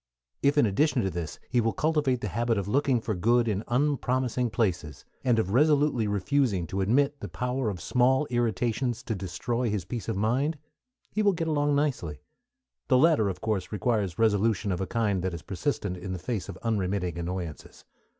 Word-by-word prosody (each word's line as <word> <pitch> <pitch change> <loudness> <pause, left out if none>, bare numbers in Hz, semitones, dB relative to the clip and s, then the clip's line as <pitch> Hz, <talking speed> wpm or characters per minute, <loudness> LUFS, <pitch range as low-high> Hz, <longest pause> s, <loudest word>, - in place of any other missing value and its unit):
If 140 +1 +2
in 145 - +6
addition 125 +5 +2
to 95 - -1
this 85 -2 -5
he 120 -1 +2
will 115 0 0
cultivate 150 -6 +1
the 105 - -2
habit 115 +4 0
of 100 -1 -2
looking 130 +1 +2
for 110 -1 -2
good 115 +6 +2
in 105 -1 -1
unpromising 125 -2 0
places, 90 - -2 0.2
and 125 -3 +3
of 100 -3 0
resolutely 145 -4 +3
refusing 100 -1 +1
to 95 - 0
admit 140 +8 +2
the 105 - -5
power 125 +6 -2
of 95 -4 -5
small 130 - +2
irritations 120 +1 0
to 115 - -2
destroy 105 +6 -2
his 105 -4 -2
peace 115 -6 -5
of - - -1
mind, 130 +9 +1 0.5
he 215 - 0
will 205 -2 +4
get 165 -2 -2
along 145 -2 +1
nicely. 125 - -1 0.6
The - - +4
latter 145 -7 +4
of 90 -1 -6
course 105 -4 -2
requires 105 -4 0
resolution 110 -2 +2
of 90 - -2
a 95 - -2
kind 105 -5 0
that 90 -1 -2
is 85 - -9
persistent 100 -3 -2
in 95 +1 -5
the - - -3
face 105 +2 -4
of - - -7
unremitting 95 -5 -1
annoyances. 85 -2 -6
115 Hz, 190 wpm, -27 LUFS, 95-130 Hz, 0.6 s, in